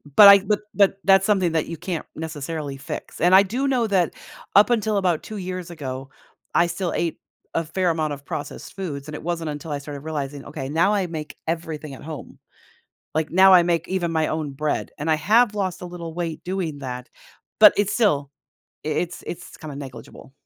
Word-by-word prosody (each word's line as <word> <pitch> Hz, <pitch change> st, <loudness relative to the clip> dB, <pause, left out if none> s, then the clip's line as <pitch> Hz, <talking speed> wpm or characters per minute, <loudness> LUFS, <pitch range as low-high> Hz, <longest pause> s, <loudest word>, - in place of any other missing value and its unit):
But 205 Hz, -, +11 dB
I 200 Hz, 0 st, +10 dB
but 205 Hz, +1 st, 0 dB
but 200 Hz, -1 st, +4 dB
that's 195 Hz, 0 st, +5 dB
something 190 Hz, -5 st, +2 dB
that 160 Hz, -, 0 dB
you 165 Hz, -, -6 dB
can't 175 Hz, -2 st, -4 dB
necessarily 155 Hz, -2 st, -5 dB
fix, 140 Hz, -, -7 dB
and 180 Hz, +3 st, +5 dB
I 195 Hz, -, +8 dB
do 250 Hz, +8 st, -1 dB
know 245 Hz, -4 st, +2 dB
that, 185 Hz, -4 st, +2 dB, 0.4 s
up 205 Hz, +4 st, +7 dB
until 220 Hz, -3 st, +1 dB
about 180 Hz, -5 st, +1 dB
2 215 Hz, -, -7 dB
years 185 Hz, -2 st, -5 dB
ago, 135 Hz, -4 st, -6 dB, 0.5 s
I 170 Hz, -, +5 dB
still 175 Hz, +1 st, -2 dB
ate 170 Hz, -2 st, -1 dB, 0.3 s
a 165 Hz, -, 0 dB
fair 175 Hz, +3 st, 0 dB
amount 155 Hz, -2 st, 0 dB
of 140 Hz, 0 st, -9 dB
processed 145 Hz, -, -6 dB
foods, 150 Hz, -7 st, -5 dB
and 150 Hz, -, -6 dB
it -, -, -8 dB
wasn't 165 Hz, -2 st, -2 dB
until 150 Hz, +1 st, -6 dB
I 145 Hz, -, -2 dB
started 140 Hz, -1 st, -8 dB
realizing, 145 Hz, -3 st, -4 dB
"Okay, 135 Hz, -3 st, -6 dB
now 170 Hz, +7 st, +3 dB
I 195 Hz, -3 st, +1 dB
make 155 Hz, -2 st, -6 dB
everything 160 Hz, -3 st, -4 dB
at 130 Hz, -, -11 dB
home." 155 Hz, -1 st, -8 dB, 0.7 s
Like, 160 Hz, 0 st, 0 dB
now 190 Hz, +1 st, +7 dB
I 180 Hz, -, +9 dB
make 170 Hz, -2 st, 0 dB
even 175 Hz, -3 st, -1 dB
my 160 Hz, -1 st, +1 dB
own 155 Hz, -2 st, -2 dB
bread, 150 Hz, +2 st, -2 dB
and 155 Hz, +2 st, -1 dB
I -, -, +5 dB
have 215 Hz, +7 st, +4 dB
lost 190 Hz, -4 st, -2 dB
a -, -, -5 dB
little 170 Hz, -2 st, -7 dB
weight 165 Hz, -2 st, -4 dB
doing 175 Hz, -6 st, -3 dB
that, 125 Hz, -2 st, -6 dB, 0.5 s
but 210 Hz, -1 st, +10 dB
it's 205 Hz, 0 st, +1 dB
still 145 Hz, -, +2 dB, 0.5 s
i -, -, -3 dB
it's 175 Hz, +3 st, -2 dB
it's 175 Hz, -, -7 dB
kinda 150 Hz, -3 st, -8 dB
negligible. 130 Hz, -1 st, -10 dB
165 Hz, 205 wpm, -23 LUFS, 150-190 Hz, 0.7 s, But